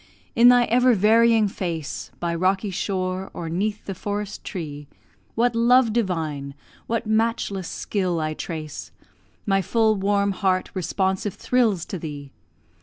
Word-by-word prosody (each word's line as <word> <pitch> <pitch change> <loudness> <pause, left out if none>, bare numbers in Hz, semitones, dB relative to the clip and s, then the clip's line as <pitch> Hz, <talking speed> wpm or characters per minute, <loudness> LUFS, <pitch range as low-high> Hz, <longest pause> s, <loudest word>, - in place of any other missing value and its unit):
in 240 0 +7
thy 245 0 +6
ever 245 +1 +4
varying 220 +2 +4
face, 170 -6 -4
By 170 -1 -1
rocky 190 +4 0
shore, 185 0 -2
or 165 -1 -5
'neath 205 +5 -2
the 195 - -4
forest 205 +1 -5
tree, 150 -5 -6 0.5
What 235 +1 +2
love 235 0 +4
divine, 160 -10 -2 0.3
what 230 0 -1
matchless 220 -4 0
skill, 185 -5 -2
I 155 0 -1
trace! 155 -1 -6 0.6
My 195 -2 +2
full 220 +3 +2
warm 200 0 +1
heart 190 -1 0
responsive 190 +1 -1
thrills 225 -9 +1
to 185 - -6
thee. 145 -3 -7
195 Hz, 135 wpm, -23 LUFS, 175-220 Hz, 0.6 s, in